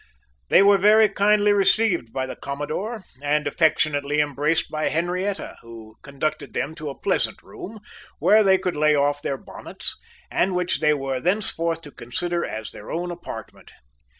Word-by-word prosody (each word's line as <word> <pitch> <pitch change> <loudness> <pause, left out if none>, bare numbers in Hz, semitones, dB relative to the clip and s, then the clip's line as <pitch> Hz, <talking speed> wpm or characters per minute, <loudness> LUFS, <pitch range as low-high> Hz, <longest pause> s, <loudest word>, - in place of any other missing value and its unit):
They - - +6
were 200 0 +5
very 215 +2 +6
kindly 205 +1 +3
received 200 - +2
by 130 +1 -2
the 130 - -7
commodore, 155 +11 -4 0.2
and 150 +1 0
affectionately 150 -1 +1
embraced 150 +2 0
by 155 0 -1
Henrietta, 180 +4 -2
who 115 -1 -12
conducted 145 +1 -4
them 155 - -2
to 155 -2 -6
a 135 - -8
pleasant - - -1
room, 220 +3 -9 0.4
where 215 +1 +5
they 190 -1 +5
could 185 -1 -3
lay 150 0 +3
off 145 0 +1
their 135 - -2
bonnets, - - -2 0.4
and 185 +1 +1
which 180 0 0
they 150 -1 +3
were 135 -2 -3
thenceforth 170 -2 0
to 145 - -10
consider 170 +9 -3
as 110 0 -5
their 105 - -11
own 175 +1 -3
apartment. 175 - -9
155 Hz, 160 wpm, -23 LUFS, 145-190 Hz, 0.4 s, They